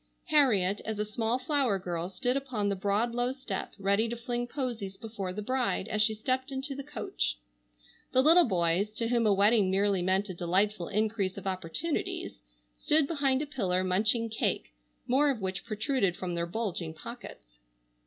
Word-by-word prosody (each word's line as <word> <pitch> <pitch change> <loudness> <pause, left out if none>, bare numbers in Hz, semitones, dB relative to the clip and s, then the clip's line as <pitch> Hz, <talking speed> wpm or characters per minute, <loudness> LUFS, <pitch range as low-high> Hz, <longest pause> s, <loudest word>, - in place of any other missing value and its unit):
Harriet, 210 -10 +4
as 220 -1 -3
a 210 - -1
small 225 +3 -1
flower 260 -5 +1
girl, 175 -2 -4
stood 245 +6 -1
upon 255 -7 -1
the 200 - 0
broad 205 +5 0
low 245 +1 0
step 260 -7 -5
ready 200 +3 +1
to 235 - -3
fling 240 +1 -3
posies 235 -8 -4
before 210 -5 -5
the 210 +3 -5
bride 255 -4 0
as 215 - +1
she 215 0 +3
stepped 260 +5 -1
into 270 +1 -3
the 275 - -5
coach. 275 - -2 0.7
The 260 - +4
little 335 +4 +7
boys, 180 +1 +2
to 230 0 -1
whom 235 -2 +2
a - - +5
wedding 205 0 +4
merely 195 0 +2
meant 190 +3 +1
a 185 - -5
delightful 180 +2 0
increase 210 -2 -1
of 195 - -8
opportunities, 185 - -3 0.3
stood 305 - +2
behind 275 -3 +1
a - - -3
pillar 190 -10 0
munching 215 +5 +2
cake, 220 - -1 0.3
more 280 +4 +3
of 265 -5 -1
which 190 -1 -4
protruded 215 -3 0
from 180 -2 -4
their 170 0 -1
bulging 175 -5 -3
pockets. - - -10
215 Hz, 175 wpm, -29 LUFS, 190-255 Hz, 0.7 s, little